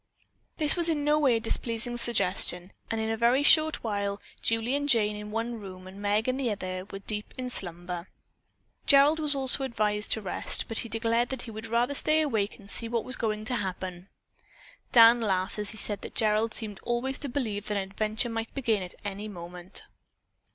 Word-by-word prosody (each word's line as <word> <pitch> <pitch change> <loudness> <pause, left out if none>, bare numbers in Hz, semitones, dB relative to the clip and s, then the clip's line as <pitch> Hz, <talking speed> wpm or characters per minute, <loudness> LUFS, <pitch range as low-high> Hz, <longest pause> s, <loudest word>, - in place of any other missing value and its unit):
This 305 -1 +4
was 340 -1 +5
in 300 -3 0
no 300 +1 +3
way 270 -5 +3
a - - +1
displeasing 230 +1 -2
suggestion 185 -6 0 0.2
and 225 - -2
in 220 0 -1
a - - 0
very 240 +5 +3
short 310 +1 +4
while 200 -2 -2 0.2
Julie 225 +2 0
and 285 0 -1
Jane 210 -5 +3
in 210 0 -7
one 225 +2 -3
room 185 -2 -10
and 190 +2 -11
Meg 210 +2 +1
in 255 0 0
the 265 -3 0
other 185 -2 -4
were 195 - -6
deep 210 +1 -4
in 255 -1 -4
slumber. 175 -2 -2 0.8
Gerald 285 +3 +6
was 300 -2 0
also 270 0 +4
advised 210 -4 -1
to - - -2
rest, 185 - -1
but 225 - +3
he 230 - -3
declared 230 +2 0
that 265 -2 -4
he 230 - -8
would 220 +1 -7
rather 235 +4 +1
stay 310 +2 +2
awake 220 -9 -1
and 200 - -16
see 230 +3 +4
what 230 -2 -1
was 255 - 0
going 215 -1 -2
to 250 +2 0
happen. 185 -2 -5 0.8
Dan 235 0 +8
laughed 190 -1 -1
as 210 -1 -3
he 220 - -7
said 205 -1 -3
that - - -9
Gerald 215 0 +1
seemed 210 -4 0
always 240 +3 -2
to 285 - -4
believe 220 -6 -3
that 210 - -1
an 195 - 0
adventure 215 +3 -1
might 225 0 -4
begin 230 -7 0
at 180 -1 -7
any 205 +1 -4
moment. 180 -2 -6
225 Hz, 205 wpm, -28 LUFS, 205-245 Hz, 0.8 s, Dan